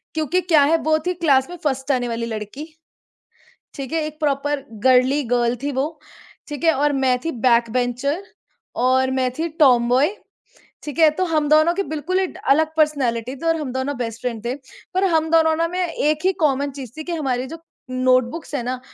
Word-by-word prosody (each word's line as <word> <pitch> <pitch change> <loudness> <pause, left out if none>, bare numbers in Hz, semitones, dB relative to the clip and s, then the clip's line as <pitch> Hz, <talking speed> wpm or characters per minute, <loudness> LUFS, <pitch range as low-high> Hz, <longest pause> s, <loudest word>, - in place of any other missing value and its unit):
क्योंकि 315 +3 +1
क्या 325 -5 +4
है 315 +4 +3
वो 310 0 +3
थी 360 - 0
क्लास 290 -5 +2
में 355 - -7
फ़र्स्ट 270 -1 -1
आने 245 -2 0
वाली 230 0 -3
लड़की, 220 +6 -6 1.1
ठीक 270 -3 -6
है। 325 - +1
एक 305 0 -8
प्रॉपर 290 -1 -1 0.2
गर्ली 260 +3 +4
गर्ल 240 0 +2
थी 285 - -1
वो, 290 +4 -3 0.5
ठीक 295 0 -7
है 325 -1 +5
और 290 +1 +1
मैं 255 -1 +3
थी 330 - 0
बैकबेंचर 245 - +1 0.6
और 260 0 +3
मैं 255 - +1
थी 330 - 0
टॉम 250 -5 +5
बॉय, 280 +11 +2 0.7
ठीक 295 0 -6
है। 320 -1 +7
तो 370 - +2
हम 300 -1 +1
दोनों 310 +3 +5
की 395 +3 -1
बिल्कुल 345 +5 -1
ही 380 - +1
ड - - -12
अलग 315 +3 +3
पर्सनैलिटी 260 -5 0
थी 305 - -9
और 330 - +3
हम 295 -5 -4
दोनों 260 +2 -2
बेस्ट 230 -1 -5
फ्रेंड 235 -4 -4
थे। 245 +2 -1 0.4
पर 375 +1 +1
हम 320 0 +1
दोनों 320 -1 +4
ना 330 +1 0
में 360 +1 -1
एक 305 0 -1
ही 380 - +3
कॉमन 280 0 0
चीज़ 265 -4 -9
थी 310 - -5
कि 345 - -4
हमारी 260 -6 -1
जो 325 +4 -9 0.3
नोटबुक्स 255 +4 0
है 275 - -1
ना, 250 +1 -3
285 Hz, 205 wpm, -21 LUFS, 255-315 Hz, 1.1 s, है